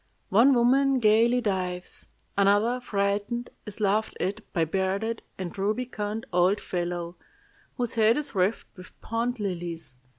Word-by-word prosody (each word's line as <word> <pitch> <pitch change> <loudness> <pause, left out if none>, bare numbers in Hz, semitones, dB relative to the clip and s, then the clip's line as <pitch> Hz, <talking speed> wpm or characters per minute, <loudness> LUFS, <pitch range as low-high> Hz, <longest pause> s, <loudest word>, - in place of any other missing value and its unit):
One 240 +7 +6
woman 265 +3 +4
gayly 230 +2 +4
dives. 185 -4 -2 0.3
Another, 205 +5 +3
frightened, 205 +2 -1 0.2
is 210 +1 -5
laughed 215 +1 +1
at 190 +3 -2
by 170 - 0
a - - +4
bearded 195 +6 -1 0.2
and 185 -2 -5
rubicund 215 +1 -2
old 180 +3 +3
fellow, 175 -1 -3 0.6
whose 245 -3 -1
head 225 +1 +4
is 295 -1 -2
wreathed 195 +2 +1
with 185 0 -14
pond 235 +2 -2
lilies. 175 -7 -4
205 Hz, 135 wpm, -27 LUFS, 185-235 Hz, 0.6 s, One